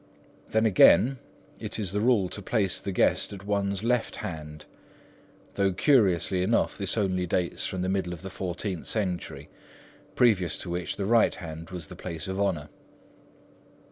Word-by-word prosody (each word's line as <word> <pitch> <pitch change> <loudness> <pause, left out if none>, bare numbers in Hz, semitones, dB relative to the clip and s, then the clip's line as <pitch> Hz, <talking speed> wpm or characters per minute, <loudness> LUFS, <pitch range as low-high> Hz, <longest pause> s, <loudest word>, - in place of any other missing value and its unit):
Then 110 +1 +2
again, 110 +5 +5 0.4
it - - -3
is 100 -5 -2
the 105 +1 -1
rule 110 -5 +3
to 105 - -6
place 100 -2 0
the 100 - -4
guest 95 - +2
at 100 -1 -10
one's 100 -1 -1
left 120 0 0
hand, 75 -2 -7 0.9
though 100 -1 +1
curiously 95 - +3
enough 105 +5 +1
this 100 +1 +1
only 95 -3 0
dates 85 0 -1
from 95 -1 -3
the - - -1
middle 95 -2 -1
of 90 0 -8
the 95 - -7
fourteenth 90 0 -4
century, 90 -8 -2 0.7
previous 95 -9 +3
to 85 - -5
which 90 0 -2
the 100 - -3
right 115 +2 +3
hand 80 -1 -8
was 90 -2 -6
the 90 - -10
place 85 0 -6
of 95 +1 -3
honour. 90 -7 -1
95 Hz, 165 wpm, -27 LUFS, 90-105 Hz, 0.9 s, again